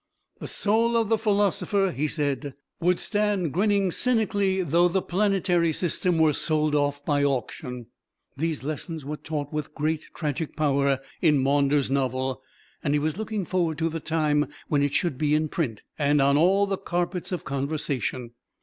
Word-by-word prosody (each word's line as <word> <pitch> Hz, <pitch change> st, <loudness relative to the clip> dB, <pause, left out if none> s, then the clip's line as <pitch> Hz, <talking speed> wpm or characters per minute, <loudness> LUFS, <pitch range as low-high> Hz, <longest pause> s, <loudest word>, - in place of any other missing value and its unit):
The -, -, -6 dB
soul 230 Hz, +3 st, +2 dB
of 225 Hz, -2 st, +1 dB
the 225 Hz, -, +3 dB
Philosopher, 200 Hz, -2 st, +1 dB
he 145 Hz, +2 st, -1 dB
said, 145 Hz, -2 st, -2 dB, 0.2 s
would 180 Hz, +1 st, +2 dB
stand 205 Hz, -7 st, 0 dB
grinning 200 Hz, 0 st, +2 dB
cynically 200 Hz, -5 st, +1 dB
though 170 Hz, +2 st, +3 dB
the 185 Hz, +2 st, +1 dB
planetary 185 Hz, -3 st, +1 dB
system 175 Hz, +1 st, +1 dB
were 160 Hz, -2 st, +4 dB
sold 155 Hz, -1 st, +1 dB
off 145 Hz, -1 st, 0 dB
by 145 Hz, -1 st, +1 dB
auction. 125 Hz, -2 st, -2 dB, 0.5 s
These 155 Hz, -1 st, -2 dB
lessons 155 Hz, +1 st, -5 dB
were 150 Hz, +2 st, -3 dB
taught 150 Hz, -2 st, -5 dB
with 150 Hz, -1 st, -4 dB
great 155 Hz, +1 st, -1 dB
tragic 150 Hz, -1 st, -3 dB
power 140 Hz, -3 st, +1 dB, 0.2 s
in 155 Hz, -4 st, +4 dB
Maunders' 140 Hz, 0 st, +2 dB
novel, 130 Hz, -1 st, -1 dB, 0.4 s
and 145 Hz, 0 st, +1 dB
he -, -, +2 dB
was 155 Hz, +3 st, -1 dB
looking 215 Hz, -3 st, -3 dB
forward 170 Hz, -3 st, 0 dB
to 165 Hz, 0 st, 0 dB
the 165 Hz, +1 st, -4 dB
time 150 Hz, -2 st, +1 dB, 0.2 s
when 145 Hz, -2 st, +2 dB
it 145 Hz, 0 st, 0 dB
should 160 Hz, -8 st, 0 dB
be 150 Hz, -1 st, +2 dB
in 155 Hz, 0 st, 0 dB
print, 125 Hz, -, -3 dB, 0.2 s
and 145 Hz, 0 st, +3 dB
on 140 Hz, +1 st, +4 dB
all 190 Hz, +6 st, +4 dB
the 195 Hz, -1 st, -2 dB
carpets 180 Hz, 0 st, -2 dB
of 180 Hz, -, -4 dB
conversation. 135 Hz, -3 st, -2 dB
155 Hz, 170 wpm, -25 LUFS, 145-185 Hz, 0.5 s, were